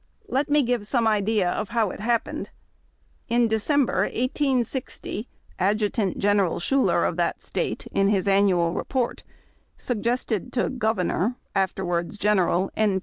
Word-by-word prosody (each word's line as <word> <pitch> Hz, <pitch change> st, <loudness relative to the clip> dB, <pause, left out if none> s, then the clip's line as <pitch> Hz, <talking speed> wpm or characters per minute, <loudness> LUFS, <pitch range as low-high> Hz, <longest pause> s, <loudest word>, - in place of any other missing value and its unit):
Let 290 Hz, -5 st, 0 dB
me 295 Hz, 0 st, +4 dB
give 240 Hz, -4 st, -1 dB
some 235 Hz, 0 st, +1 dB
idea 210 Hz, -2 st, +2 dB
of 210 Hz, -, -3 dB
how 225 Hz, -5 st, +1 dB
it -, -, -9 dB
happened. 230 Hz, +2 st, -1 dB, 0.8 s
In 235 Hz, 0 st, +3 dB
December, 245 Hz, +5 st, +1 dB
1860, 255 Hz, -3 st, -2 dB, 0.3 s
Ad 200 Hz, +3 st, +2 dB
jutant 210 Hz, -2 st, -1 dB
General 200 Hz, -3 st, +2 dB
Schoulev 270 Hz, +9 st, +2 dB
of -, -, -3 dB
that -, -, -1 dB
State, -, -, -3 dB
in 195 Hz, -, +2 dB
his 200 Hz, -1 st, +1 dB
annual 190 Hz, -4 st, +3 dB
report, 255 Hz, +3 st, -2 dB, 0.6 s
sug 240 Hz, -5 st, -3 dB
gested 240 Hz, -1 st, -1 dB
to 245 Hz, -, +1 dB
Governor 220 Hz, -2 st, 0 dB, 0.2 s
(afterwards 185 Hz, -1 st, -1 dB
General) 195 Hz, -3 st, +2 dB
N. 205 Hz, -3 st, +2 dB
215 Hz, 140 wpm, -25 LUFS, 195-245 Hz, 0.8 s, me